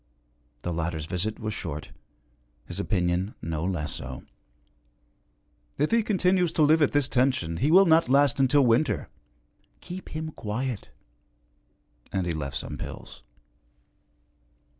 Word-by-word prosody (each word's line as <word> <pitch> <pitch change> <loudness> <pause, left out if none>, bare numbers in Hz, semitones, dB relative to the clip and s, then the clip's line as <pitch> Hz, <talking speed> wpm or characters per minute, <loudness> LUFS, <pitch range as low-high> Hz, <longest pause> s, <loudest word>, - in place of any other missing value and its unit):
The 90 - -2
latter's 80 -1 -2
visit 95 +6 -2
was 110 -1 -3
short, 75 -7 -5 0.7
his - - -5
opinion 90 +1 0
no 80 -1 -3
less 85 -6 -2
so: 65 0 -7 1.5
'If 150 - +1
he 230 0 +4
continues 185 -4 +2
to 155 - +3
live 155 +2 +5
at 145 - +4
this 145 -2 +2
tension 125 -12 +1
he 140 - +1
will 190 +4 +7
not 160 -5 +4
last 140 0 +4
until 135 +1 +4
winter. 115 - +2 0.7
Keep 180 +1 -8
him 155 0 -5
quiet.' 120 -1 -4 1.2
And 95 -2 -1
he 85 - -1
left 70 -3 -3
some - - -6
pills. - - -8
120 Hz, 130 wpm, -27 LUFS, -, 1.5 s, will